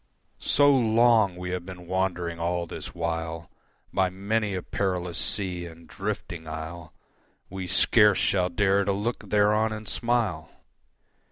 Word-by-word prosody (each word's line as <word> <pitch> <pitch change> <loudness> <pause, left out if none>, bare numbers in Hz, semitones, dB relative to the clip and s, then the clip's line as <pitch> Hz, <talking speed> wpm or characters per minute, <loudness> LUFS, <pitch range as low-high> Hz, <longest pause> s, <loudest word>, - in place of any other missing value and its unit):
So 145 0 +4
long 115 -4 +4
we 90 0 -5
have 90 -1 -3
been 90 -1 -10
wandering 90 -2 -1
all 85 +1 -1
this 80 - -8
while 80 -1 -3 0.4
By 95 -1 +2
many 100 +2 -1
a 90 - -4
perilous 90 -3 -2
sea 90 -4 -2
and 85 0 -13
drifting 95 -5 -5
isle, 80 +1 -7 0.6
We 95 -1 -5
scarce 105 +2 +4
shall 90 -2 +2
dare 100 +2 +2
to 100 0 0
look 105 +5 -3
thereon 105 +1 +3
and 110 -1 -6
smile. 110 -10 -1
95 Hz, 140 wpm, -26 LUFS, 85-105 Hz, 0.6 s, So